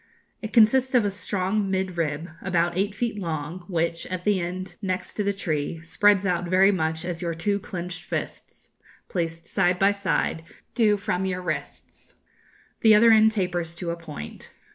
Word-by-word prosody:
It 215 Hz, -, -5 dB
consists 255 Hz, +3 st, +4 dB
of 235 Hz, -4 st, +4 dB
a 200 Hz, -, 0 dB
strong 195 Hz, +1 st, -1 dB
mid 190 Hz, -1 st, -1 dB
rib 160 Hz, -1 st, -2 dB
about 175 Hz, -2 st, 0 dB
eight 200 Hz, +2 st, 0 dB
feet 225 Hz, -1 st, -2 dB
long, 165 Hz, 0 st, -4 dB
which, 170 Hz, -2 st, -1 dB
at 185 Hz, -1 st, -4 dB
the 205 Hz, -1 st, +2 dB
end 185 Hz, +2 st, -5 dB
next 185 Hz, -2 st, -3 dB
to 210 Hz, -, -2 dB
the 200 Hz, -, +1 dB
tree, 165 Hz, -5 st, -2 dB
spreads 200 Hz, +3 st, +3 dB
out 175 Hz, -1 st, 0 dB
very 190 Hz, +3 st, +5 dB
much 160 Hz, -3 st, -1 dB
as 175 Hz, -1 st, -4 dB
your 170 Hz, -2 st, -2 dB
two 200 Hz, +5 st, 0 dB
clenched 180 Hz, -2 st, -6 dB
fists, -, -, -6 dB, 0.4 s
placed 165 Hz, -2 st, -3 dB
side 180 Hz, 0 st, +2 dB
by 195 Hz, +2 st, +4 dB
side, 200 Hz, -4 st, -1 dB, 0.3 s
do 215 Hz, -3 st, +3 dB
from 195 Hz, -2 st, -1 dB
your 185 Hz, -1 st, -3 dB
wrists. 155 Hz, -5 st, -6 dB, 0.6 s
The 220 Hz, -1 st, +6 dB
other 230 Hz, +2 st, +7 dB
end 220 Hz, 0 st, +6 dB
tapers 175 Hz, -5 st, -2 dB
to 170 Hz, 0 st, -3 dB
a -, -, -2 dB
point. 80 Hz, -, -9 dB
185 Hz, 175 wpm, -25 LUFS, 170-205 Hz, 0.6 s, other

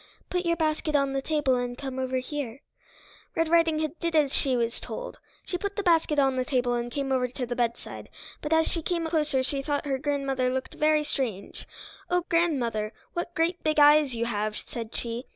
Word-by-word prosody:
"Put 360 Hz, -1 st, 0 dB
your 335 Hz, -, +3 dB
basket 310 Hz, -1 st, 0 dB
on 275 Hz, -1 st, +2 dB
the 270 Hz, -, 0 dB
table 295 Hz, -2 st, +1 dB
and 245 Hz, 0 st, -1 dB
come 265 Hz, -2 st, -5 dB
over 260 Hz, 0 st, -1 dB
here." 255 Hz, -1 st, -4 dB, 0.7 s
Red 330 Hz, -1 st, +1 dB
Riding 330 Hz, -1 st, +4 dB
Hood 310 Hz, +1 st, -2 dB
did 335 Hz, -1 st, -1 dB
as 290 Hz, -3 st, +3 dB
she 260 Hz, -3 st, +1 dB
was 235 Hz, 0 st, 0 dB
told. -, -, -7 dB, 0.3 s
She 360 Hz, -, -3 dB
put 405 Hz, +1 st, -3 dB
the 410 Hz, -, -2 dB
basket 325 Hz, -4 st, +3 dB
on 270 Hz, -2 st, +3 dB
the 255 Hz, -, +2 dB
table 250 Hz, -2 st, +1 dB
and 240 Hz, 0 st, -2 dB
came 275 Hz, 0 st, -2 dB
over 255 Hz, -1 st, +2 dB
to 250 Hz, +1 st, -4 dB
the 245 Hz, 0 st, -3 dB
bedside, 235 Hz, -1 st, -3 dB, 0.3 s
but 300 Hz, -, -4 dB
as 320 Hz, 0 st, +4 dB
she 335 Hz, -, -1 dB
came 335 Hz, +1 st, -1 dB
closer 300 Hz, -5 st, +1 dB
she 275 Hz, +1 st, -2 dB
thought 290 Hz, +1 st, -1 dB
her 270 Hz, -2 st, -1 dB
grandmother 275 Hz, -3 st, 0 dB
looked 260 Hz, 0 st, -3 dB
very 305 Hz, 0 st, +3 dB
strange. 250 Hz, -9 st, -3 dB, 0.4 s
"Oh, 355 Hz, -1 st, +1 dB
grandmother, 245 Hz, -11 st, +1 dB, 0.2 s
what 345 Hz, 0 st, -4 dB
great 335 Hz, +2 st, 0 dB
big 310 Hz, 0 st, +1 dB
eyes 295 Hz, -3 st, +6 dB
you 235 Hz, 0 st, 0 dB
have," 215 Hz, -2 st, -2 dB
said 230 Hz, -2 st, -6 dB
she. 235 Hz, +2 st, -4 dB
280 Hz, 205 wpm, -27 LUFS, 250-320 Hz, 0.7 s, eyes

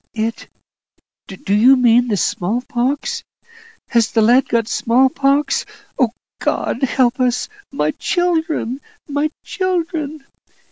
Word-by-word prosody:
"It 225 Hz, +1 st, -3 dB, 0.8 s
do 195 Hz, 0 st, -4 dB
you 240 Hz, +6 st, +6 dB
mean 245 Hz, 0 st, +4 dB
the 210 Hz, -3 st, 0 dB
small 205 Hz, +7 st, -1 dB
pox? 280 Hz, -, -2 dB, 0.7 s
Has 235 Hz, -2 st, +2 dB
the 225 Hz, -, +2 dB
lad 245 Hz, +4 st, +4 dB
got 230 Hz, -2 st, +1 dB
small 245 Hz, +3 st, +3 dB
pox? 275 Hz, +2 st, +1 dB, 0.4 s
Oh, 250 Hz, -4 st, +4 dB, 0.3 s
God -, -, -1 dB
help 255 Hz, -1 st, +1 dB
us! 250 Hz, -1 st, +1 dB, 0.2 s
My 155 Hz, -, 0 dB
children 320 Hz, -, -1 dB, 0.3 s
my 290 Hz, +1 st, 0 dB, 0.2 s
children!" 330 Hz, -6 st, -2 dB
255 Hz, 120 wpm, -18 LUFS, 230-295 Hz, 0.8 s, you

